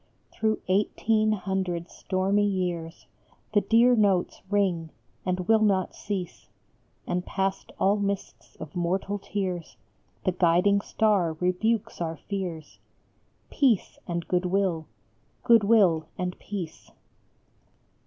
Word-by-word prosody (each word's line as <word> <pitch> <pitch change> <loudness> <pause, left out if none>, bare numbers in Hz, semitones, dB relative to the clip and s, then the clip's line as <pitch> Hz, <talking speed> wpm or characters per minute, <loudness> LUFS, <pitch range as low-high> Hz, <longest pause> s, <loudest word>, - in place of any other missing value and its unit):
Through 220 0 0
eighteen 215 +3 +2
hundred 185 -3 -2
stormy 195 +2 +1
years 175 -4 -3 0.5
The 205 - +4
dear 230 +5 +5
notes 200 -5 +1
ring, 185 -5 +1 0.4
and 185 0 0
will 225 -1 +5
not 195 -4 +2
cease; 190 -4 -5 0.6
And 180 0 -1
past 195 +1 -2
all 200 +2 +3
mists 200 -1 -4
of 155 -2 -10
mortal 190 +4 -1
tears 185 -4 -4 0.5
The 185 - +2
guiding 180 +3 +3
star 200 -7 +1
rebukes 195 +6 -1
our 165 -1 -2
fears, 175 -4 -6 0.7
Peace 255 -9 +1
and 170 -1 -3
Good 180 0 +1
will: 180 -4 0 0.6
Good 230 -2 +6
will 190 -8 +4
and 180 0 -2
Peace. 185 -6 -7
190 Hz, 115 wpm, -27 LUFS, 175-205 Hz, 0.7 s, Good